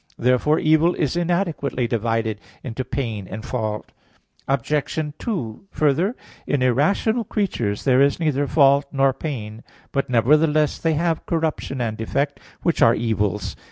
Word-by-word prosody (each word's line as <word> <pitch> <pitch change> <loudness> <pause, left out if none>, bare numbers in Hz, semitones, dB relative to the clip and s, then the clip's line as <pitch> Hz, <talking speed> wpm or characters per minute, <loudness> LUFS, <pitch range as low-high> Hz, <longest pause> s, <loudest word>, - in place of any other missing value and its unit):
Therefore 125 +5 +2
evil 160 +3 +3
is 150 0 -1
inadequately 170 -7 0
divided 115 -2 -1 0.2
into 130 0 -4
pain 115 -7 -4
and 110 +4 -7
fault. 110 -5 -3 0.6
Obj. 140 +3 0 0.2
2: 145 - -4
Further, 155 - +1 0.3
in 140 -3 +1
irrational 180 - +2
creatures 145 - -2
there 130 -1 +4
is 140 +3 +3
neither 145 -3 +1
fault 140 -1 +4
nor 135 -1 +3
pain; 115 -8 -6 0.3
but, 140 -1 -1
nevertheless, 150 +5 +3
they 165 -1 +1
have 165 +1 -1
corruption 160 -4 -1
and 110 -2 -2
defect, 140 +6 -1 0.2
which 170 - +1
are 115 - +6
evils. 105 -3 -1
140 Hz, 135 wpm, -22 LUFS, 115-155 Hz, 0.6 s, are